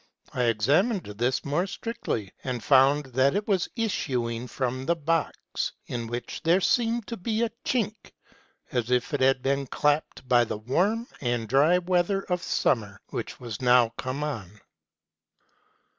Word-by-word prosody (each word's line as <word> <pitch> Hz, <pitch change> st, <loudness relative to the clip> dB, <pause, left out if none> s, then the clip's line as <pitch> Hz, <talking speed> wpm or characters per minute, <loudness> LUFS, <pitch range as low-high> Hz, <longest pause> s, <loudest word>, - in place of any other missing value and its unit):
I 125 Hz, -, +1 dB
examined 145 Hz, -, +2 dB
this 120 Hz, +5 st, -1 dB
more 150 Hz, +7 st, 0 dB
strictly, 115 Hz, -, -4 dB
and 125 Hz, -4 st, -3 dB
found 140 Hz, +3 st, +5 dB
that 130 Hz, +2 st, +3 dB
it 205 Hz, +1 st, -1 dB
was 190 Hz, -4 st, +1 dB
issuing 125 Hz, -, -1 dB
from 130 Hz, 0 st, -3 dB
the 170 Hz, -, +3 dB
box, 165 Hz, 0 st, -2 dB
in 115 Hz, -1 st, -4 dB
which 120 Hz, +1 st, -5 dB
there 170 Hz, +3 st, +4 dB
seemed 230 Hz, +2 st, +1 dB
to 230 Hz, -, -5 dB
be 220 Hz, +4 st, -1 dB
a 230 Hz, -, 0 dB
chink, 220 Hz, -4 st, -2 dB, 0.6 s
as 120 Hz, -1 st, -1 dB
if 125 Hz, +1 st, +1 dB
it 145 Hz, -, 0 dB
had 130 Hz, -1 st, +3 dB
been 140 Hz, 0 st, 0 dB
chapped 145 Hz, -1 st, 0 dB
by 120 Hz, -1 st, +5 dB
the 110 Hz, -, -3 dB
warm 185 Hz, -, 0 dB, 0.2 s
and 120 Hz, -3 st, -1 dB
dry 145 Hz, +9 st, +4 dB
weather 180 Hz, +2 st, +1 dB
of 180 Hz, -1 st, -2 dB
summer, 105 Hz, -, 0 dB
which -, -, -5 dB
was 120 Hz, -3 st, -6 dB
now 125 Hz, -2 st, +5 dB
come 130 Hz, +5 st, -4 dB
on. 110 Hz, -9 st, -5 dB
135 Hz, 155 wpm, -27 LUFS, 120-180 Hz, 0.6 s, found